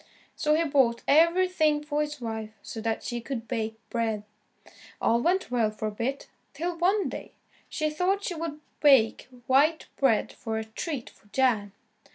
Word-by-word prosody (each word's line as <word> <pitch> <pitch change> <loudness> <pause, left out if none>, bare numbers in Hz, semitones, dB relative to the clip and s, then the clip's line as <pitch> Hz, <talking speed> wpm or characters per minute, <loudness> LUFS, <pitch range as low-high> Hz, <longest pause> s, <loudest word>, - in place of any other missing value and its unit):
So 300 0 +2
he 330 - +2
bought 265 -6 +2
everything 325 -1 +4
for 300 0 -1
his 300 -1 -3
wife 220 -2 -4
so 225 - -6
that 225 0 -2
she 240 -1 -3
could 230 -1 -5
bake 220 -2 -2 0.2
bread. 225 -3 -1 0.8
All 235 +1 +2
went 360 0 +1
well 235 -3 +2
for 215 0 -4
a - - -7
bit, 240 +6 -3 0.3
till 345 +1 -2
one 380 +5 +2
day, - - -7 0.4
she 310 -1 -1
thought 370 +6 0
she 365 - -2
would 320 -2 -5 0.2
bake 265 -8 +5 0.2
white 290 +5 +3
bread 250 -6 +2
for 225 -2 -4
a 220 - -2
treat 245 +4 -5
for - - -25
Jan. 210 -4 +1
270 Hz, 170 wpm, -27 LUFS, 225-315 Hz, 0.8 s, bake